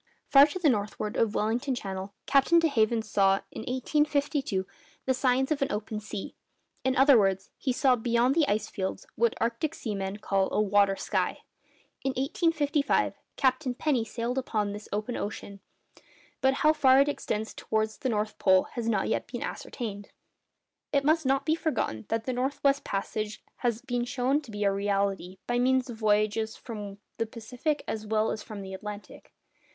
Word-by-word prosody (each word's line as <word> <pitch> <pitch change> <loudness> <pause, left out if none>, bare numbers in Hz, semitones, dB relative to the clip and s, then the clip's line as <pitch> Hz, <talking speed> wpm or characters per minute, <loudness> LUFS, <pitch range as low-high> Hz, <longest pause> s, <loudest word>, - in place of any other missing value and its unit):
Far 280 +1 +8
to 305 - -5
the 350 -4 +2
northward 210 -3 0
of 220 -2 +1
Wellington 240 +5 0
Channel, 195 -3 -5
Captain 275 +5 +4
de 330 -1 +5
Haven 225 -4 +2
saw, 195 -2 +2
in - - -7
1852, 280 -5 0 0.4
the 260 - +2
signs 260 +2 +1
of 295 - 0
an 275 - +1
open 210 +1 -3
sea—in 215 +5 -6
other 270 -2 +7
words, 195 -1 0
he 265 - 0
saw, 255 0 +3
beyond 235 +2 +2
the 310 -1 +3
ice 215 -1 0
fields, 190 -1 -4
what 235 0 +1
arctic 235 +6 -1
seamen 195 -3 -3
call 195 -2 0
a - - +1
'water 200 -1 +3
sky.' - - -2 0.6
In 270 0 0
1855 290 0 +1 0.2
Captain 260 -1 +1
Penny 260 -3 +1
sailed 235 +3 -2
upon 210 -5 -1
this 210 +1 -8
open 215 +4 -2
sea; 200 -1 -9 0.8
but 265 0 +3
how 305 - +7
far 270 -3 +5
it 280 - +5
extends 220 -6 -2
towards 220 0 -1
the 260 - -1
North 215 -1 -2
Pole 190 -1 +5
has 230 -2 -2
not 205 -4 +1
yet - - -1
been - - -5
ascertained. 205 -5 -6 0.8
It 280 -1 +2
must 315 -1 +3
not 270 +1 +2
be 315 - +3
forgotten 305 - -2
that 225 0 0
the 255 - -1
north 260 +3 -1
west 280 0 +3
passage 210 +2 -3
has 235 -1 -1
been 245 -2 -1
shown 270 +3 +1
to 270 - -14
be 205 -1 -3
a 200 - +3
reality, 195 -2 -1
by 240 0 0
means 260 0 +2
of 225 - -8
voyages 215 0 +1
from 205 -4 -7 0.2
the 225 - -1
Pacific 250 +7 -3
as 215 -1 -4
well 215 +1 +1
as 215 - -4
from 210 -3 -8
the 190 0 -7
Atlantic. 210 +2 -8
230 Hz, 175 wpm, -28 LUFS, 210-270 Hz, 0.8 s, Far